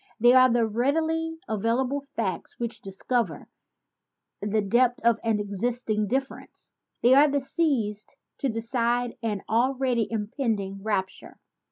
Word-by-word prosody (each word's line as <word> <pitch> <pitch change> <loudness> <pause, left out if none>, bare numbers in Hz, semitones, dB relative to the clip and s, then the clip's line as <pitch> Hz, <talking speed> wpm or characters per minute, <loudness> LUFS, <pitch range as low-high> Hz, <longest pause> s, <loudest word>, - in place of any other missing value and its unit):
They 240 +2 +6
are 255 0 +7
"the 235 -1 +2
readily 320 +8 0
available 245 +6 0
facts 190 -7 -3
which 235 -2 -3
discover 195 - -2 0.9
the 210 +1 0
depth 240 +4 +2
of 235 -1 +4
an 225 -2 +1
existing 215 +1 -1
difference; 265 +5 -4 0.3
they 245 +2 +6
are 285 +2 +6
seized 255 -8 -1 0.2
to 275 - 0
decide 235 +1 -1
an 210 -4 -2
already 250 0 +1
impending 210 -3 -2
rupture." 195 -3 -3
235 Hz, 120 wpm, -26 LUFS, 210-255 Hz, 0.9 s, are